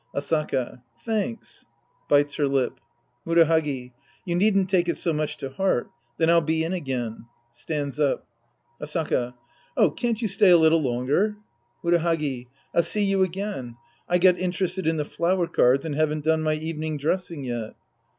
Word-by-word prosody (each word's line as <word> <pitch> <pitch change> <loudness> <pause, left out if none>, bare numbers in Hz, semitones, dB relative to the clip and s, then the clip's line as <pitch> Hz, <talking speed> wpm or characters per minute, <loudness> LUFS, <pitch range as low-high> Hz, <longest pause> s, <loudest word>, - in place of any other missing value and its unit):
Asaka. 140 -4 -1 0.2
Thanks. 225 +1 -3 0.4
{Bites 145 0 +4
her 150 - +2
Up.) 135 -2 0 0.4
Murahagi. 160 -6 +2 0.3
You 175 - -2
needn't 195 +1 +3
take 180 -2 +2
it - - -1
so 165 - 0
much 150 0 -2
to 135 - -5
heart. 190 -5 0 0.3
Then 160 - +2
I'll 170 0 +5
be 160 +1 0
in 165 +3 -2
again. 125 -9 -4 0.2
{Stands 145 +3 -4
up!) 145 -3 +1 0.6
Asaka. 150 -5 -1 0.4
Oh, - - +5
can't 235 -2 -1
you 230 - 0
stay 200 0 +4
a 175 - +8
little 160 0 +4
longer? 140 - 0 0.5
Murahagi. 165 -7 0 0.3
I'll - - +4
see 210 +4 -1
you 195 -1 +2
again. 185 - -3 0.3
I 180 - +4
got 180 0 +4
interested 185 -1 -2
in 160 0 +2
the 150 - -1
flower 175 +3 0
cards 135 -2 +3
and 155 - -3
haven't 155 0 0
done 160 0 +3
my 155 0 +1
evening 155 0 -4
dres 165 +6 0
sing 160 -5 -7
yet. 120 -3 -4
160 Hz, 160 wpm, -25 LUFS, 140-180 Hz, 0.6 s, a